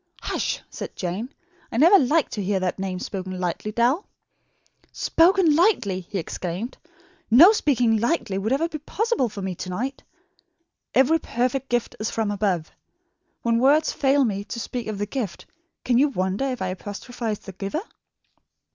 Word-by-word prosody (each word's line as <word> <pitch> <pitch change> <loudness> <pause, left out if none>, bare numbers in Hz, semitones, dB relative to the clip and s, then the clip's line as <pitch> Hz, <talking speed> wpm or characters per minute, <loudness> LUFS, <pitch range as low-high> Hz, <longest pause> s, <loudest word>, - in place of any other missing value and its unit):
"Hush," - - -1
said - - -7
Jane; 195 +8 -4 0.4
"I - - -3
never 340 +9 +7
like 300 +5 +2
to 210 - -3
hear 195 0 0
that 185 0 -2
name 190 -1 -3
spoken 185 0 -5
lightly, 180 +4 -2
Dal." 245 - +1 0.8
"Spoken 340 -2 +4
lightly!" 295 - +2
he 190 +2 -6
exclaimed. 180 +6 -4 0.5
"No 300 - +9
speaking 245 - +2
lightly 220 - 0
would 270 - 0
be 305 - -5
possible 440 - 0
for 200 -2 -7
me 190 -1 -2
to 180 +1 -7
night. 250 +9 -3 0.9
'Every 275 +6 +5
perfect 255 +1 -1
gift 240 -1 -1
is 215 - -1
from 220 -2 -1
above.' 190 -6 -1 0.7
When 230 -1 +2
words 290 +5 +4
fail 275 0 +3
me 200 -3 -2
to 235 - -6
speak 240 0 -4
of 215 -2 -3
the 205 - -1
gift, 215 -5 -4 0.4
can 245 -1 +3
you 290 - +5
wonder 190 -2 -1
if 255 -6 -2
I 185 - -1
apostrophise 210 +4 -5
the 195 - -10
Giver?" 200 - -4
230 Hz, 160 wpm, -24 LUFS, 195-275 Hz, 0.9 s, No